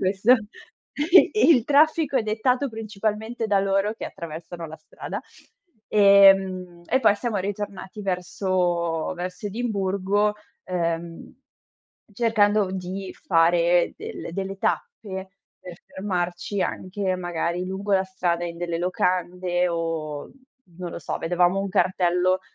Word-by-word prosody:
questo. 195 +6 +4 0.6
E 335 +6 +5 0.2
il 255 -9 +6
traffico 300 0 +3
è 250 - +3
dettato 250 +6 0
principalmente 220 +1 -3
da 200 -2 +3
loro 195 +2 +1
che - - -7
attraversano 170 +1 -8
la 160 0 -9
strada. - - -7 0.7
Ehm, 195 -3 +5
e 260 - +2
poi 220 -4 +5
siamo 230 0 -2
ritornati 200 0 -5
verso 180 -3 -1
verso 180 +4 -5
Edimburgo, 205 -2 0 0.3
ehm, 170 -2 -3 0.8
cercando 210 -2 +2
v 185 - -6
di 190 +1 -5
fare 170 0 +3
del - - -7
delle 195 +1 -4
tappe 195 - -3 0.3
per 180 -2 -10
fermarci 185 0 -3
anche 185 0 -2
magari 175 0 -2
lungo 195 +2 -3
la 190 0 +3
strada 175 -2 -1
in 170 -1 -5
delle 170 -1 -2
locande 180 0 0
o, 165 -3 -3 0.5
non 180 -1 -5
lo - - -5
so, - - -4
vedevamo 180 +3 +2
un 195 - -2
cartello 180 0 +2
190 Hz, 120 wpm, -24 LUFS, 175-205 Hz, 0.8 s, il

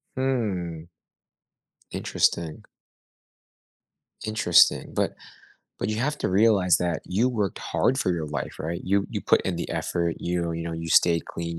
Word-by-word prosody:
Mm. 95 -11 -2 1.0
Interesting. 80 -2 0 1.6
Interesting. 110 -6 +4
But - - 0 0.7
but - - -2
you 110 - -2
have 150 +6 -1
to - - -1
realize 100 -3 +4
that 85 -2 -1
you 110 +7 +1
worked 105 -7 -2
hard 130 - 0
for 95 - +1
your 80 -3 -2
life, 75 -2 -5
right? 85 +2 -4
You 100 +1 +1
you - - -3
put - - +3
in 95 -3 -2
the 85 - -4
effort, 85 -1 -1
you 85 -1 -1
you 85 0 -4
know, 85 0 -4
you 80 0 -5
stay 85 0 +4
clean, 85 0 -6
90 Hz, 150 wpm, -25 LUFS, 85-105 Hz, 1.6 s, Interesting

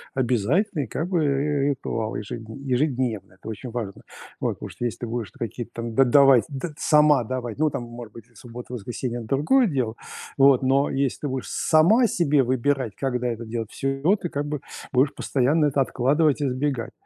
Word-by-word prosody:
обязательный 135 - +1
как 160 +9 -3
бы 175 -4 +1
ри 140 0 +1
ритуал 115 -5 -3
ежедн 110 +1 -7
ежедневно. 125 -7 -1
Это - - -12
очень 110 +3 -6
важно. 110 -5 -5 0.4
Вот. - - 0
Потому - - -8
что - - -8
если 120 - -2
ты 120 - -4
будешь 115 -4 -4
то - - -21
какие-то 120 0 -5
там 115 -1 -5
д 135 - +6
давать, 135 -1 +6
д 145 +3 -5
сама 150 -5 +4
давать, 120 -1 -4
ну, 155 +1 +2
там, 140 -4 -4
может 120 -2 -10
быть, 115 -1 -12
и 120 - -29
в 105 - -20
субботу, 120 +1 -10
воскресенье- 120 +2 -4
это 115 - -8
другое 160 - +3
дело, 125 -8 -1 0.4
вот, 135 -2 +6
но 135 +2 +2
если 135 -1 -1
ты 145 - -2
будешь 130 -1 -4
сама 175 +11 +4
себе 150 -8 +2
выбирать, 130 -2 0
когда 125 -2 -1
это 115 0 -5
делать- 115 -1 -5
всё, 135 - -2
и - - -13
вот 195 +5 +3
ты 175 - -2
как 145 -1 -3
бы 150 -1 -3 0.3
будешь 135 +2 +2
постоянно 145 +4 +1
это 140 0 0
откладывать 145 +4 +2
и 145 - +1
избегать. 130 -1 -2
130 Hz, 205 wpm, -24 LUFS, 120-145 Hz, 0.4 s, д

